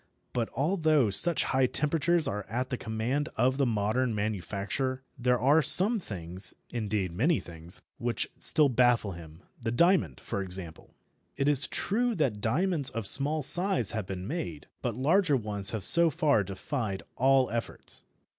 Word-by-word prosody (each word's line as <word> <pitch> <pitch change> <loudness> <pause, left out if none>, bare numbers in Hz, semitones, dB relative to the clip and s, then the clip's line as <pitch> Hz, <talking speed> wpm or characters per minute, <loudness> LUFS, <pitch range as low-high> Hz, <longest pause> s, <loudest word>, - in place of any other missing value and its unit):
But 120 -2 -2
although 155 - +1
such 170 - +6
high 130 -1 +1
temperatures 165 +4 0
are 105 +1 -3
at 125 +4 -3
the - - 0
command 120 +6 -3
of 130 +1 +1
the 140 -2 +1
modern 110 +2 -1
manufacturer, 105 +6 -3
there 125 0 0
are 145 +7 +4
some 205 - +4
things 95 - -5 0.2
indeed 105 -6 -2
many 140 - +1
things 85 +1 -9 0.2
which 120 -1 -2
still 155 -3 +4
baffle 120 -4 +2
him, 80 -1 -12 0.2
the - - -2
diamond, 120 - +2
for 100 - -4
example. 90 -3 -6 0.4
It 135 0 0
is 140 -2 +5
true 235 +3 -1
that 125 -10 -1
diamonds 150 - 0
of 115 -1 -5
small 145 +8 +1
size 175 - +1
have 105 -3 -4
been 95 0 -6
made, 90 - -5 0.2
but 120 -3 -3
larger 150 - +2
ones 105 -3 0
have 110 -3 -4
so 170 - +7
far 140 -7 +1
defied 100 +2 -5
all 135 0 +2
efforts. 115 -3 -6
125 Hz, 155 wpm, -28 LUFS, 100-145 Hz, 0.4 s, so